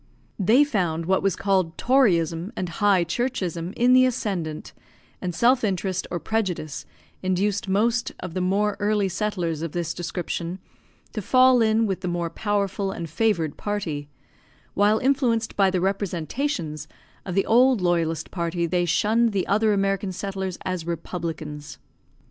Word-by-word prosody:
They 225 +9 +5
found 175 - -1
what 190 +2 +2
was 195 -3 +1
called 190 -5 0
toryism 180 - +2
and 180 - -3
high 190 +1 +3
churchism 180 -4 -2
in 245 +1 +4
the 255 0 +6
ascendant, 185 -11 -3 0.5
and 180 -2 -3
self 245 +5 +3
interest 190 -2 -1
or 175 - -3
prejudice 185 -10 -3 0.3
induced 195 +2 0
most 230 +5 +1
of 180 -3 -6
the 185 - -2
more 200 +3 +1
early 205 -1 +1
settlers 180 -5 -2
of 165 -2 -4
this 170 -1 -2
description 175 +1 -4 0.6
to 215 - -3
fall 255 +3 +5
in 220 0 +3
with 190 -3 -2
the 180 - -3
more 175 -1 -2
powerful 200 0 -1
and 170 -4 -6
favoured 170 -7 0
party; 160 -9 -3 0.6
while 205 +2 +3
influenced 245 -3 +1
by 195 -2 +4
the 185 -1 0
representations 185 - -2 0.4
of 180 -3 -5
the 195 - +2
old 250 +1 +4
loyalist 165 -3 0
party 170 -1 -1
they 175 +1 +1
shunned 220 +6 +2
the 190 -2 0
other 215 +2 +2
American 195 -1 0
settlers 190 -1 -4
as 185 -3 -2
republicans. 160 -3 -5
190 Hz, 150 wpm, -24 LUFS, 170-215 Hz, 0.6 s, the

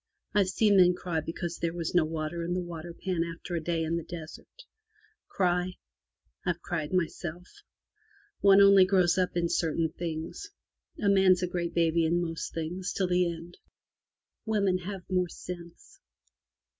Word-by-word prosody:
Fve 205 -2 +3
seen 205 +1 +3
men 180 -1 +6
cry 175 -2 -2
because 170 +2 -5
there 170 0 -2
was 170 -2 -3
no 175 -2 +5
water 160 +1 -3
in 175 +1 -2
the - - 0
waterpan 175 +1 -3
after 170 +1 -7
a 170 - -1
day 165 0 0
in 165 +1 -1
the 170 - -4
desert. 175 - -10 0.6
Cry? 180 -1 0 0.7
Fve 175 -2 -1
cried 155 -4 -3
myself. 175 -1 -2 0.9
One 200 0 +7
only 200 -1 +8
grows 185 -1 +3
up 180 -1 0
in 170 0 +1
certain 165 -1 0
things. 165 - -5 0.5
A 205 - 0
man's 190 -2 +5
a - - +1
great 175 -1 -3
baby 165 0 +3
in 165 +2 +2
most 165 -2 -3
things 170 +3 -4
till 190 - 0
the 180 -1 +2
end. 170 +1 -10 0.8
Women 200 -4 +1
have 190 0 -7
more 180 -1 0
sense. 170 0 -10
175 Hz, 155 wpm, -29 LUFS, 165-185 Hz, 0.9 s, only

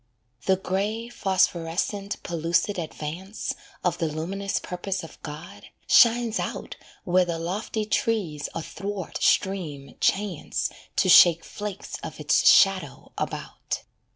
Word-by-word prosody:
The 190 - +5
grey, 205 +5 -2
phosphorescent, 190 0 0
pellucid 170 +3 0
advance 170 +5 -5 0.3
Of 180 -3 0
the 165 - +1
luminous 185 +6 -3
purpose 185 +1 -3
of 165 - -12
God, 170 +7 -9 0.2
shines 235 -1 +5
out - - -4 0.3
Where 185 0 +3
the 170 -2 -2
lofty 200 +6 -3
trees 210 - -1
athwart 195 +3 -5
stream 165 -8 0
chance 195 -4 0 0.2
To - - +2
shake 170 -2 +8
flakes 205 -2 -6
of - - -7
its - - +4
shadow 190 -7 +4
about. - - -4
185 Hz, 115 wpm, -26 LUFS, 165-205 Hz, 0.3 s, shake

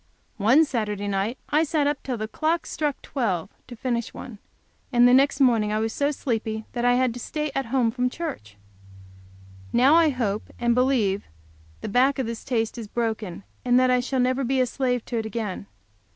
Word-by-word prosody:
One 245 +10 +5
Saturday 210 -6 -2
night 200 +5 -1
I 305 +2 +3
sat 305 -2 0
up 290 0 0
till 255 -3 -3
the 215 0 -3
clock 320 +7 -1
struck 295 -3 -2
twelve 200 - -2 0.2
to 245 - -9
finish 235 -1 -3
one, 220 -5 -9 0.5
and 245 -1 +6
the 245 - +5
next 270 +1 +4
morning 230 -6 +3
I 215 - 0
was 220 0 -1
so 285 0 +1
sleepy 225 -6 -3
that 240 - -2
I 245 0 +4
had 255 -1 +2
to 245 - -8
stay 300 +4 -3
at 270 -3 -2
home 240 -2 +1
from 250 +1 0
church. 110 - -6 1.1
Now 260 +5 +5
I 330 -1 +6
hope 220 -6 -2
and 240 0 +2
believe 235 -6 +1 0.6
the - - -4
back 255 +6 +3
of 265 - -1
this 230 0 -5
taste 235 -2 -1
is 225 - -6
broken, 220 -5 -3 0.2
and 250 0 +4
that 255 0 +3
I 250 - +4
shall 260 +1 -2
never 255 +2 +1
be 265 +1 0
a 255 - +4
slave 250 -1 -1
to 235 -2 -2
it 220 - -4
again. 210 - -4
245 Hz, 200 wpm, -24 LUFS, 220-270 Hz, 1.1 s, and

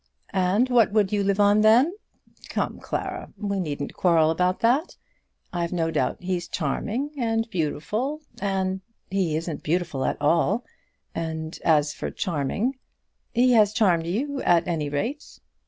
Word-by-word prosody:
"And 195 +5 +2
what 235 -4 +5
would 210 -3 +3
you 205 -1 +2
live 200 0 +1
on 205 +1 +5
then? 240 +10 +5 0.6
Come - - -2
Clara, - - -4
we 200 -1 -2
needn't 145 -5 -3
quarrel 165 -3 +3
about 180 +3 0
that. 255 +9 +2 0.6
I've 170 -1 -1
no 165 -2 0
doubt 180 - -1
he's 180 -2 -2
charming, 215 - -2
and 225 -1 0
beautiful, 215 - -2 0.2
and 190 -1 -1
" - - -47
"He 185 -5 +1
isn't 160 -1 -3
beautiful 160 -4 -1
at - - 0
all; 165 +10 +2 0.5
and 160 -1 -4
as 150 -2 +3
for - - -4
charming 200 - -2 0.2
" - - -49
"He 250 +2 +5
has 215 -3 +5
charmed 175 -8 +2
you 270 +10 -2
at 170 -1 +3
any 155 -4 -1
rate." 230 - -4
190 Hz, 155 wpm, -25 LUFS, 165-225 Hz, 0.6 s, what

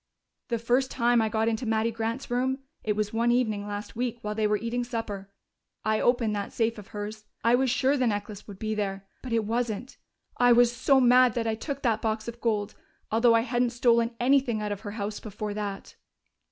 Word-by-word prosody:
"The 235 - 0
first 245 +3 +1
time 240 -1 +2
I 220 - +1
got 220 +1 0
into 230 +1 -1
Mattie 220 +1 +1
Grant's 230 +3 -4
room 260 +2 +1 0.3
it 210 -1 0
was 210 0 -1
one 235 +1 +2
evening 215 -4 0
last 205 +2 -6
week, 240 0 -2
while 210 0 -2
they 215 0 +1
were 210 0 +2
eating 230 +3 -2
supper 225 -5 -5 0.6
I 215 0 +2
opened 240 -4 +2
that 200 -1 -4
safe 225 -1 0
of 205 - -11
hers. 210 +1 -7 0.2
I 230 +2 +4
was 260 +1 +3
sure 265 +3 +2
the 255 -3 +1
necklace 205 -1 -4
would 200 -2 -9
be 215 +2 -2
there. 195 -2 -3 0.2
But 255 - -7
it 225 -2 +1
wasn't. 235 +2 -2 0.4
I 245 0 +6
was 240 0 +4
so 270 +2 +4
mad 250 -1 +5
that 235 -1 -1
I 225 - +1
took 275 +5 -5
that 225 -3 +1
box 220 0 -2
of 235 0 -7
gold, 210 -3 0 0.4
although 230 +1 +5
I 230 - +4
hadn't 245 0 +1
stolen 235 -1 +2
anything 250 -3 +3
out 210 -1 -3
of 205 - -3
her 205 - -6
house 205 0 -3
before 210 0 -5
that." 205 -2 -5
230 Hz, 215 wpm, -27 LUFS, 210-245 Hz, 0.6 s, I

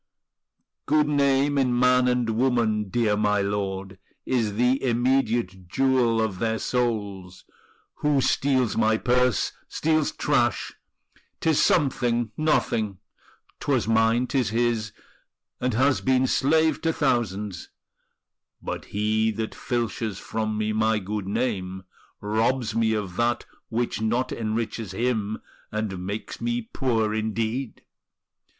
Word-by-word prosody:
"Good 150 0 +3
name 140 -1 +2
in 125 -2 +2
man 125 0 +4
and 125 -1 +1
woman, 110 -3 +1
dear 110 -1 +1
my 105 -1 +1
lord, 100 -1 -3 0.3
Is 115 -5 0
the 125 +4 +2
immediate 120 -7 0
jewel 125 +1 +2
of 105 -5 -1
their 110 -1 0
souls: 100 -7 -2 0.5
Who 150 -2 +2
steals 130 -3 +1
my 110 -1 +3
purse 125 -2 +2 0.2
steals 155 -1 +1
trash; 120 -6 0 0.7
'tis 160 -2 +2
something, 120 -7 +2
nothing; 110 -10 0 0.6
'Twas 95 - 0
mine, 115 +2 +3
'tis 125 -5 0
his, 115 -1 0 0.7
and 125 -2 -1
has 130 +3 +3
been 130 0 +2
slave 155 +4 +2
to 165 - +1
thousands; 105 - -1 0.9
But - - -5
he 110 +2 0
that 110 +1 -4
filches 115 -4 -2
from 110 0 -3
me 110 0 -1
my 110 0 +2
good 105 0 -4
name, 95 -4 -2 0.4
Robs 110 +2 0
me 115 0 +2
of 100 -5 -3
that 120 0 +1 0.2
which 115 -1 -2
not 120 +4 0
enriches 110 -2 -3
him, 110 -1 -1 0.3
And 105 -4 -3
makes 105 +2 -5
me 240 0 -1
poor 115 -6 0
indeed!" 110 +3 -2
115 Hz, 120 wpm, -25 LUFS, 105-125 Hz, 0.9 s, man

